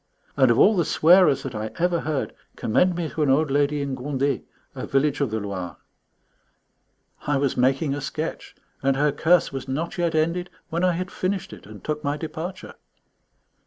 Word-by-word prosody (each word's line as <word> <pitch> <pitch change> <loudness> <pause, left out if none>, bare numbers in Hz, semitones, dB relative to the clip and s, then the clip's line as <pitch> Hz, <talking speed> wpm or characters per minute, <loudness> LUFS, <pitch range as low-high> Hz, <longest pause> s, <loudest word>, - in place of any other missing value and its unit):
And 130 -3 +4
of 115 - +3
all 215 - +6
the 175 - +2
swearers 170 -1 +5
that 135 - -5
I 110 0 -4
ever 175 0 +1
heard, 150 -3 -2 0.2
commend 180 +11 +2
me 170 -2 -2
to 160 - -4
an 145 - +2
old 145 +2 +3
lady 145 +1 +1
in 140 -1 -3
Gondet, 135 +1 -1 0.3
a - - -6
village 145 +1 +1
of 140 - +1
the 110 +1 -2
Loire. 95 -4 -5 1.5
I 145 -1 +2
was 135 -1 0
making 135 +3 +2
a 145 - -4
sketch, 155 +3 -5 0.3
and 135 0 +2
her 145 +2 +2
curse 165 +4 +3
was 135 0 -5
not 155 +7 -3
yet 170 -2 0
ended 170 +3 0 0.2
when 170 +2 -1
I 180 -1 +3
had 180 +2 -4
finished 185 - -3
it 100 - -13
and 105 -1 -12
took 150 0 -3
my 145 0 -1
departure. 165 +4 -6
145 Hz, 190 wpm, -24 LUFS, 135-170 Hz, 1.5 s, all